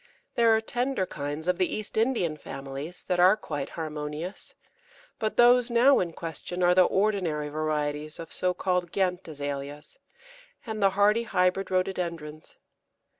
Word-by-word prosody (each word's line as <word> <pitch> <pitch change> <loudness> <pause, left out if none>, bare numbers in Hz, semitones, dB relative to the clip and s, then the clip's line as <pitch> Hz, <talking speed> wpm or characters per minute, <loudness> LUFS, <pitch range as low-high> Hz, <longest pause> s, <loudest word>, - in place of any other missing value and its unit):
There 235 -1 +4
are 220 - +1
tender 245 -2 -1
kinds 150 +1 -5
of 180 -1 +1
the 185 - +1
East 215 -1 -6
Indian 220 -9 +1
families 140 +3 -7
that 180 - -1
are 185 +4 +6
quite 145 -9 -5
harmonious, 155 +3 -5 0.6
but 215 -1 -2
those 245 0 +6
now 245 +4 +5
in 175 -2 -1
question 175 +2 -5
are 175 0 +5
the 185 0 +6
ordinary 185 -8 0
varieties 150 0 -2
of 165 -1 -8
so 180 0 0
called 180 -2 -1
Ghent 185 -2 -1
Azaleas, 145 - -6 0.7
and 220 -2 -4
the 195 - +5
hardy 210 +3 +4
hybrid 190 -3 +1
Rhododendrons. 170 -5 -3
180 Hz, 145 wpm, -27 LUFS, 150-205 Hz, 0.7 s, are